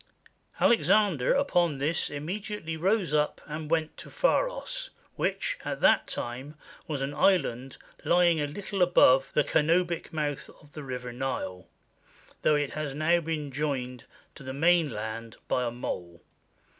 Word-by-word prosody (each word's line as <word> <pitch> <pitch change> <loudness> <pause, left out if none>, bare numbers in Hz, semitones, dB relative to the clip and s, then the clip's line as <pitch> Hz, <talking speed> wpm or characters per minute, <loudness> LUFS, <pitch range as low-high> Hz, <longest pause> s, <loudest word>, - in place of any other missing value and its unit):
Alexander 205 - +3
upon 175 - +2
this 150 +5 0
immediately 165 +3 -5
rose 185 +1 +1
up 150 0 +1
and 150 0 -6
went 160 -1 0
to - - -10
Pharos, - - 0 0.3
which, - - -1
at - - -4
that - - +4
time, 130 +5 -5 0.3
was 145 -4 -2
an 140 +1 -3
island 135 -9 +1 0.3
lying 170 -2 +3
a 145 - 0
little 195 +5 -5
above 135 -6 +5
the 150 - +4
Canobic 170 +3 +1
mouth 150 -3 -3
of 145 - -20
the 150 - -7
river 125 -3 -6
Nile, 95 -8 -4 0.7
though 150 - +4
it 145 -2 0
has 150 -3 -4
now 165 +3 +3
been 155 -3 -4
joined 130 -3 -3 0.3
to - - -13
the 130 -1 -6
main 165 +1 +3
land 110 0 -6
by 125 - +1
a 120 - 0
mole. 90 -8 -6
150 Hz, 145 wpm, -28 LUFS, 135-175 Hz, 0.7 s, above